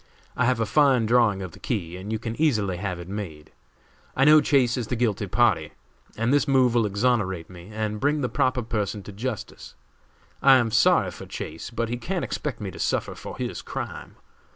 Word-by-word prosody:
I 125 - +1
have 125 -1 +2
a 115 - +1
fine 130 0 +3
drawing 110 -4 +3
of 90 - -6
the - - -14
key 90 -8 -3
and 95 +4 -7
you 110 - 0
can 115 0 -5
easily 105 - +1
have 90 -2 -4
it 85 - -8
made. 90 -7 -7 0.6
I 135 - +3
know 155 0 +8
Chase 130 -5 +3
is 120 -4 -3
the 125 - -2
guilty 110 -4 0
party, 95 -7 +2 0.4
and 115 +4 +1
this 145 -2 +3
move 130 -3 +4
will 115 -3 +3
exonerate 100 -5 0
me 90 +1 -12
and 105 0 -3
bring 145 +3 +1
the 125 - 0
proper 130 0 0
person 105 -3 -3
to 105 - -9
justice. 110 +2 -6 0.7
I 135 -1 +7
am 120 -3 +2
sorry 110 - +4
for - - -10
Chase, 80 +1 -6
but 115 -1 -2
he 120 - -2
can't 175 +9 -3
expect 135 -7 -4
me 100 -3 -5
to - - -11
suffer - - -1
for - - -9
his - - -4
crime. - - -6
115 Hz, 205 wpm, -25 LUFS, 100-125 Hz, 0.7 s, know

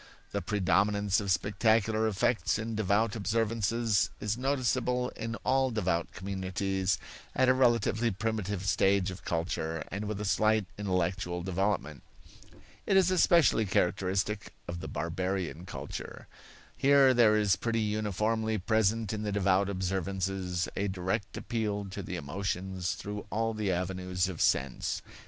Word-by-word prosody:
The - - -2
predominance 100 0 +2
of 100 -2 -4
spectacular 110 +3 +2
effects 105 -1 +1
in 110 +1 -4
devout 105 +1 +1
observances 110 -3 +1
is 105 +1 -1
noticeable 125 -1 0
in 115 0 -5
all 130 0 +3
devout 90 -7 -1
communities 95 0 -1 0.4
at 130 - +3
a - - +6
relatively 120 -2 +2
primitive 105 -2 -2
stage 100 -1 +2
of 95 - -10
culture 80 -1 -2
and 100 +3 -3
with 105 -1 -3
a 105 - -3
slight 110 +1 +2
intellectual 90 -2 -1
development. 95 -5 -1 0.9
It 195 - +4
is 185 -1 +4
especially 170 - +4
characteristic 95 +2 0
of 85 0 -5
the - - -6
barbarian 90 0 -3
culture. - - -7 0.5
Here 140 -1 +5
there 115 -3 +5
is 105 -3 +3
pretty 115 +2 -1
uniformly 110 +1 0
present 110 +2 +1
in 105 - -3
the 105 -1 -2
devout 100 0 +2
observances 95 -1 -2
a 100 - 0
direct 95 +3 -3
appeal 105 -3 -2
to 100 - -5
the 90 -1 -5
emotions 90 +3 -3
through 105 0 -6
all 115 +1 0
the 105 -3 -1
avenues 90 0 -1
of 90 -4 -5
sense. 65 -1 0
100 Hz, 135 wpm, -30 LUFS, 95-110 Hz, 0.9 s, a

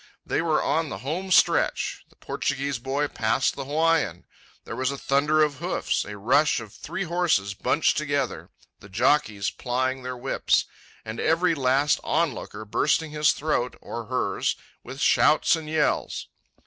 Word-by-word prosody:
They - - 0
were 160 -2 +1
on 160 -1 0
the - - -5
home 180 +7 -3
stretch. 185 - +2
The - - -25
Portuguese 140 -2 -2
boy 135 +4 -1
passed 110 -5 0
the 135 - -5
Hawaiian. 155 - +1 0.4
There - - -7
was 130 +2 0
a 140 - -4
thunder 150 +3 +2
of 145 -2 -1
hoofs, 175 +5 -1
a 105 - -8
rush 135 +9 +3
of 110 -2 -9
the - - -17
three 170 +5 -4
horses 170 - +1
bunched 145 +9 +1
together, 145 -4 -2 0.3
the 100 - -14
jockeys 110 -2 +1
plying 130 +1 -2
their 125 0 -5
whips, 130 +2 +1 0.4
and 110 +1 -6
every 165 +2 +2
last 140 0 +2
onlooker 140 -8 -2
bursting 150 +8 +1
his 150 0 +3
throat, 140 -5 -1
or 115 -1 -6
hers, 125 +3 -1 0.3
with 135 - -9
shouts 155 +3 +4
and 160 -2 -7
yells. 155 -1 0
140 Hz, 160 wpm, -25 LUFS, 125-155 Hz, 0.4 s, shouts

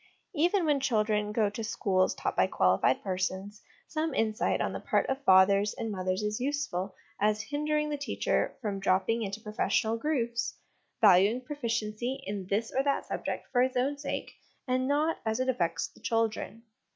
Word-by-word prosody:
Even 350 +3 +2
when 295 -2 +3
children 215 -5 +1
go 215 -1 +2
to 205 +3 -5
schools 190 -3 +1
taught - - -2
by - - +3
quali 95 - +2
fied 130 - +2
persons, 190 +2 -3 0.3
some 315 -1 -2
insight 220 -1 +1
on - - -1
the - - -4
part - - +1
of 265 +1 -3
fathers 195 +2 +5
and 225 - -3
mothers 185 0 -2
is 210 0 -1
useful 255 -9 -2 0.2
as 210 +1 +2
hindering 300 +4 -1
the 295 - -2
teacher 285 - -1
from 200 -2 -2
drop 190 -1 +2
ping 230 +1 0
into 200 0 -3
professional 220 +1 0
grooves, 235 -5 -1 0.5
valuing 205 +3 +6
proficiency 240 -2 -3
in 200 -2 -4
this 220 +3 -1
or 265 - +4
that 280 0 0
subject - - -4
for 245 - +3
its 255 0 +1
own 270 +3 +1
sake, 285 0 -4 0.4
and 255 0 +1
not 300 +3 +1
as 220 +1 -1
it 255 - 0
affects 175 -10 0
the - - -21
children. 225 0 -1
225 Hz, 175 wpm, -29 LUFS, 200-270 Hz, 0.5 s, valuing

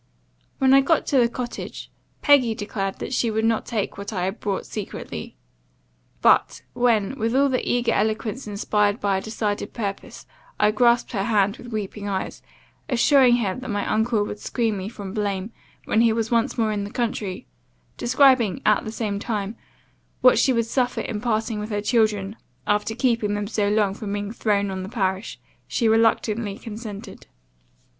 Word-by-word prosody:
"When 265 0 +4
I 275 - +7
got 300 +3 +2
to 275 - +2
the 235 -1 +4
cottage, 240 0 -6 0.3
Peggy 260 -6 +5
declared 200 -2 -3
that - - -5
she 240 -2 +1
would 220 0 0
not 225 -1 +1
take 210 -3 -3
what 200 +3 -5
I 185 -4 -2
had 190 +4 -3
brought 200 -2 -2
secretly; 210 -3 -6 0.9
but, - - +3
when, 240 0 +1
with 225 +2 0
all 280 +1 +4
the 255 -1 0
eager 245 0 +1
eloquence 220 +3 -1
inspired 205 +1 +1
by 200 -1 +1
a - - -3
decided 215 -1 -3
purpose, 200 -4 -5 0.3
I 210 0 +4
grasped 235 +2 +3
her 200 -5 -1
hand 205 0 +2
with 245 - -11
weeping 205 -1 -4
eyes, 190 -1 -3 0.5
assuring 255 0 +5
her 210 -6 0
that 255 +3 -7
my 205 -1 -1
uncle 220 -1 +1
would 205 - -6
screen 225 -2 -1
me 195 +1 -4
from 200 -4 -8
blame, 205 -1 -2 0.3
when 220 - +2
he 230 -1 +4
was 225 0 -2
once 230 -1 +1
more 220 -2 +1
in 205 -1 -2
the 200 - -5
country, 215 -5 -3 0.5
describing, 255 -5 +4
at 210 - +4
the 220 - -5
same 210 -3 -3
time, 210 -1 -3 0.7
what 255 -3 +6
she 260 - +4
would 230 -2 +1
suffer 245 +1 0
in 210 -3 -4
parting 220 -1 -1
with 210 +1 -5
her 205 -1 -1
children, 210 -2 +1 0.3
after 210 +2 0
keeping 230 -4 +1
them 205 0 -2
so 205 -1 0
long 205 -2 +2
from 200 0 -5
being 205 0 -3
thrown 200 -3 0
on 190 0 -4
the 185 - -6
parish, 190 -2 -2 0.3
she 235 - 0
reluctantly 220 -1 +2
consented. 215 -3 -8
220 Hz, 180 wpm, -23 LUFS, 205-235 Hz, 0.9 s, I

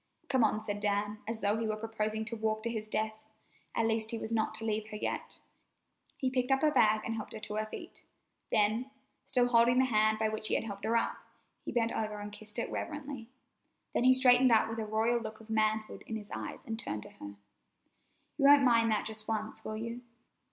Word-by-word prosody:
"Come 260 -4 +3
on," 215 0 +1
said 205 -1 -3
Dan, 205 +1 0
as 225 0 -3
though 205 +2 +2
he 225 0 -1
were 215 - 0
proposing 220 0 -2
to 230 - -3
walk 220 -1 -1
to 235 - -1
his 215 -2 -4
death. 220 0 -1 0.6
At 230 - +2
least, 220 -1 0
he 230 - -1
was 220 - -5
not 220 -1 0
to 225 - 0
leave 215 -1 -1
her 215 - -8
yet. - - -4 0.8
He 260 -1 -1
picked 255 0 0
up 270 +2 +2
her 305 - +5
bag, 215 -6 +4
and 225 - -2
helped 220 -2 -6
her 220 - -6
to 210 - -6
her 215 0 -1
feet; - - -9 0.5
then, 215 +5 +2 0.4
still 245 -1 +3
holding 240 +1 +5
the 260 - +5
hand 215 -3 +3
by 220 0 +1
which 215 0 -2
he - - +1
had - - 0
helped 200 -3 -6
her 230 +1 +3
up, - - 0 0.5
he - - -5
bent 230 -1 +1
over 215 -1 -2
and 205 0 -6
kissed 210 +1 -9
it 235 - -2
reverently. 280 -6 -5 0.6
Then - - +1
he 255 +1 +7
straightened 255 -1 +6
up 220 -1 +5
with 225 0 -4
a 220 - -2
royal 225 +3 +1
look 220 -1 -7
of 220 0 -11
manhood 215 0 0
in 225 - -4
his 210 -1 -8
eyes - - -6
and 225 -1 -4
turned 105 - -4
to - - -12
her: 100 0 -10 1.0
"You 275 - +3
won't 285 0 +8
mind 230 -3 +4
that 215 -1 +1
just 215 -1 -5
once, 215 -1 -3
will 215 - -4
you? 230 +2 -5
220 Hz, 230 wpm, -32 LUFS, 215-235 Hz, 1.0 s, won't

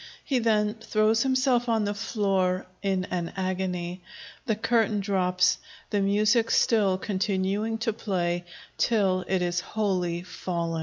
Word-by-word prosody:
He 265 -3 +1
then 210 -2 +2
throws 220 +1 +2
himself 255 -2 +2
on 220 -2 +2
the 205 - -1
floor 195 -3 0 0.2
in 190 -2 0
an 175 -2 -2
agony. 185 -1 -2 0.5
The 220 - +2
curtain 225 -1 +1
drops, 180 -2 +2 0.3
the 205 - +1
music 210 +4 +3
still 205 -5 +3
continuing 200 +2 -1
to 225 -1 -1
play 175 -5 -2 0.3
till 195 -5 +2
it 190 -1 +1
is 175 0 0
wholly 180 -4 -1
fallen. 170 -2 -3
195 Hz, 135 wpm, -26 LUFS, 180-220 Hz, 0.5 s, music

